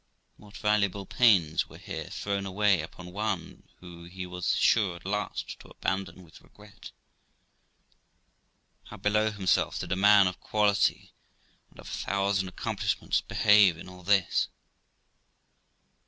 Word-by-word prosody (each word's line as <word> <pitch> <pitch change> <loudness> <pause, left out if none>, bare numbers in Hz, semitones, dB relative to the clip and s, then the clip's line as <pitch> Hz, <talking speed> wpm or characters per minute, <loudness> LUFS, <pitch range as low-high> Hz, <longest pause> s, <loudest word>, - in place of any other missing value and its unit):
What 105 -1 -14
valuable 100 -2 0
pains 95 -10 +3
were - - -13
here - - -7
thrown 100 -1 -3
away 95 -2 +2
upon 90 +3 -10
one, 105 -3 -4
who 85 -1 -12
he 90 +1 -7
was 90 -1 -2
sure, 100 -6 +2
at 85 - -14
last, 105 +2 -4
to - - -15
abandon 95 -1 -4
with 80 -2 -17
regret! 105 0 -15 2.0
How - - -11
below 105 +2 +1
himself 95 -4 0
did - - -6
a - - +2
man 100 +1 +6
of 90 -1 -2
quality 105 -2 +1 0.6
and - - -21
of - - -11
a - - -8
thousand 100 -1 -1
accomplishments 95 - -2
behave 105 -5 +4
in 85 - -11
all 90 0 -12
this 95 0 +2
100 Hz, 135 wpm, -28 LUFS, 90-105 Hz, 2.0 s, man